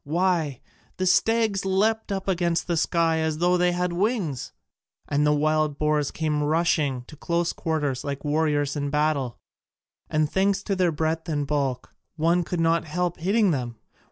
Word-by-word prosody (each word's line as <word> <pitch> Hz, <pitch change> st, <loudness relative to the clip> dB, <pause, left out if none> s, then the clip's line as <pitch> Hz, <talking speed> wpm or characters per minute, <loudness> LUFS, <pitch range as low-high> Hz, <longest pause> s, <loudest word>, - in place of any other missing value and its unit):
Why, 165 Hz, -3 st, 0 dB, 0.4 s
the 185 Hz, -, -1 dB
stags 220 Hz, +1 st, +2 dB
leapt 210 Hz, +3 st, +1 dB
up 195 Hz, 0 st, -3 dB
against 175 Hz, -2 st, 0 dB
the 170 Hz, -, -1 dB
sky 165 Hz, 0 st, +1 dB
as 160 Hz, -1 st, -1 dB
though 175 Hz, +2 st, +3 dB
they 180 Hz, 0 st, +3 dB
had 180 Hz, 0 st, -1 dB
wings, 185 Hz, -, -1 dB, 0.6 s
and 145 Hz, +1 st, +1 dB
the -, -, +4 dB
wild 155 Hz, 0 st, +1 dB
boars 150 Hz, -2 st, +1 dB
came 155 Hz, -2 st, -1 dB
rushing 150 Hz, -4 st, +1 dB
to 150 Hz, -, -13 dB
close 170 Hz, +3 st, -1 dB
quarters 150 Hz, -5 st, -2 dB
like 140 Hz, 0 st, -5 dB
warriors 145 Hz, -1 st, +1 dB
in 145 Hz, -1 st, -2 dB
battle! 150 Hz, -4 st, 0 dB, 0.7 s
And 155 Hz, 0 st, +1 dB
thanks 195 Hz, +4 st, +1 dB
to 195 Hz, -, -1 dB
their 180 Hz, -2 st, +2 dB
breadth 160 Hz, +2 st, -2 dB
and 145 Hz, -2 st, -1 dB
bulk 135 Hz, -3 st, -2 dB, 0.2 s
one 170 Hz, +2 st, +2 dB
could 175 Hz, +1 st, -3 dB
not 165 Hz, 0 st, +2 dB
help 175 Hz, +2 st, -2 dB
hitting 200 Hz, +3 st, +2 dB
them. 125 Hz, -5 st, -3 dB
160 Hz, 165 wpm, -25 LUFS, 150-180 Hz, 0.7 s, the